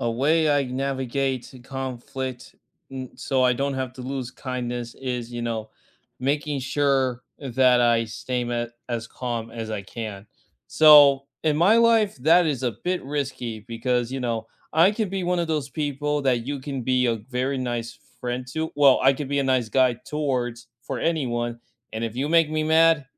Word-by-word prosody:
A 120 - 0
way 150 +6 +2
I 145 -1 +3
navigate 130 0 -2
e 130 - -12
conflict 130 -1 -6 0.4
n 130 -1 -6
so 130 -1 0
I 125 0 +4
don't 140 +2 -1
have 130 -2 -3
to 130 - -8
lose 130 -1 -4
kindness 120 -2 -5
is, 125 -2 -4
you 120 0 -4
know, 110 -2 -3 0.5
making 145 +2 -1
sure 130 -2 +1 0.2
that 130 -2 +3
I 120 -1 +3
stay 125 +3 -3
m 120 0 -2 0.2
as 115 -2 -3
calm 115 -2 -4
as 115 -1 -6
I 105 -2 -3
can. 105 0 -7 0.4
So 145 -3 +7 0.2
in 155 -2 +2
my 185 +8 +5
life, 230 -3 +4
that 165 +6 +5
is 140 -5 -1
a 125 -2 0
bit 180 -3 -1
risky 135 -5 -3
because, 120 +2 -1
you 135 - -3
know, 115 -3 -2 0.3
I 165 +5 +5
could 215 -3 -2
be 195 -1 -2
one 180 0 +1
of 170 -1 -1
those 150 -3 -1
people 145 0 -2
that 125 -3 +1
you 140 -1 -3
can 135 -1 -4
be 125 +1 +2
a 115 -1 +1
very 130 +2 -1
nice 120 -2 -4 0.2
friend 125 +1 -3
to 160 0 -2
Well, 140 -2 +6
I 135 +1 +6
could 135 0 -5
be 140 0 0
a - - +1
nice 130 -3 +1
guy 130 +1 +3
towards 125 -5 -2 0.2
for 135 - -4
anyone. 120 -7 -1 0.3
And 110 +1 -3
if 115 -1 -4
you 140 +3 -1
make 165 -1 +4
me 155 0 0
mad, 160 -1 +4
130 Hz, 185 wpm, -24 LUFS, 120-145 Hz, 0.5 s, So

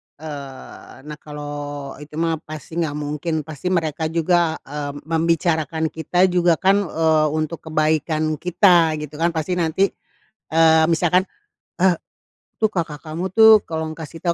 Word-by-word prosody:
Eee, 140 -3 -9
nah 150 +1 -8
kalau 145 -1 -7
itu 150 0 -11
mah 165 0 0
pasti 155 +2 -8
nggak 155 -3 -1
mungkin, 150 +2 -3
pasti 155 +3 -7
mereka 160 -3 0
juga, 165 0 +1
eee, 145 0 -5
membicarakan 160 -1 0
kita 170 +3 0
juga 175 -1 +3
kan, 195 +5 +3
eee, 160 -1 +2
untuk 155 +1 -2
kebaikan 155 0 0
kita 175 -3 +4
gitu 150 0 -7
kan 170 +1 +1
pasti 180 +3 -1
nanti, 170 +4 +1 0.6
eee, 160 0 +5
misalkan, 175 +2 +3 0.6
eee, 185 -1 +4 0.7
"Tuh 220 - +4
kakak 165 -6 -3
kamu 165 +4 -4
tuh 220 -1 +8
tolong 160 -1 -4
kasih 165 0 -9
tau," 170 -2 +1
160 Hz, 140 wpm, -21 LUFS, 150-170 Hz, 0.7 s, tuh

